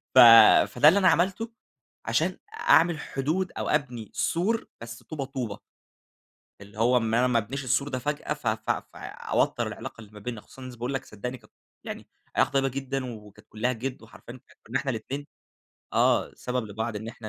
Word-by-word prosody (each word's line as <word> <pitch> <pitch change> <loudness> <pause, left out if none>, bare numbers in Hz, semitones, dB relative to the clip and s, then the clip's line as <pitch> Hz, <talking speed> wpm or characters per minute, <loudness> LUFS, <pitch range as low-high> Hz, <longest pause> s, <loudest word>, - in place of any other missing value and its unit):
ف 130 - +9 0.5
فده 125 +5 +4
اللي 190 +6 +7
أنا 185 - +4
عملته 190 +7 +1 0.5
عشان - - 0 0.3
أعمل 165 -1 +5
حدود 160 +8 -2
أو - - -2
أبني 125 -8 -1
سور 210 +7 0
بس 115 0 -9
طوبة 150 -4 -5
طوبة. 125 -7 -5 1.0
اللي 100 +2 -13
هو 125 +2 +4
إن 115 -2 +1
أنا 125 +2 +4
ما 125 -2 +3
أبنيش 130 +6 -4
السور 135 +3 +1
ده 130 -2 -3
فجأة 150 +2 -2
ف 150 - -13
ف 110 0 -1 0.2
فأوتر - - -1
العلاقة - - -7
اللي 105 -2 -13
ما 105 - -11
بينا، 115 0 -5
خصوصًا 130 - -15
إن 130 - -7
باقول 120 +3 -4
لك 135 - -3
صدّقني 125 +4 -7 0.4
يعني - - -7 0.3
علاقة - - +3
طيبة 135 0 +2
جدًا 135 0 -3
وكانت 105 -2 -15
كلّها 120 +4 -1
جد 125 +1 -5
وحرفيًا 120 +2 -12 0.3
كُنا 130 +4 -1
إحنا 135 +1 -2
الاتنين 135 +5 -5 0.7
آه، - - +2
سبب 125 -3 -3
لبعض 110 +2 -4
إن 110 +2 -6
إحنا 110 -1 -8
125 Hz, 175 wpm, -27 LUFS, 115-140 Hz, 1.0 s, ف